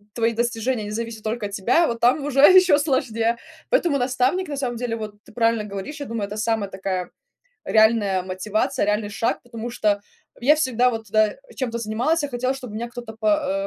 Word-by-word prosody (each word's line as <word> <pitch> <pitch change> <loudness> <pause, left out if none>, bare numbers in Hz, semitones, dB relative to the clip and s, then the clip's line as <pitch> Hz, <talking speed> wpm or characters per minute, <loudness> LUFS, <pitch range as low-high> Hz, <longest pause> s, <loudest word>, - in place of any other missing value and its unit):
твои 230 0 +1
достижения 235 0 -1
не - - -6
зависят 225 0 -5
только 220 0 -2
от 200 - -5
тебя, 235 - +2
вот 235 -1 -3
там 255 +5 +3
уже 280 -2 -1
еще 365 -1 +7
сложнее. 235 -5 0 0.3
Поэтому 345 - +2
наставник 260 +9 +1
на 285 - -5
самом 250 -3 -2
деле, 235 -1 -2
вот 215 -2 -6
ты - - -16
правильно 230 -2 +1
говоришь. 205 +9 -6
Я 285 - -5
думаю, 225 -2 -3
это 210 +2 -7
самая 215 -2 -1
такая 190 -1 -3 0.5
реальная 215 -4 +3
мотивация. 210 +8 -1
Реальный 210 0 0
шаг. 230 +3 -1
Потому 235 -1 -7
что 210 -4 +1 0.4
я 275 +5 +5
всегда 255 -5 +2
вот, 225 -2 -5
да, 215 0 +3
э, - - -17 0.2
чем-то 235 -3 -2
занималась. 235 +9 0
Я 290 - -2
хотела, 255 0 -1
чтобы 250 -5 -8
меня 235 +2 -4
кто-то 235 -2 -9
по 205 -2 +1
230 Hz, 200 wpm, -23 LUFS, 215-255 Hz, 0.5 s, еще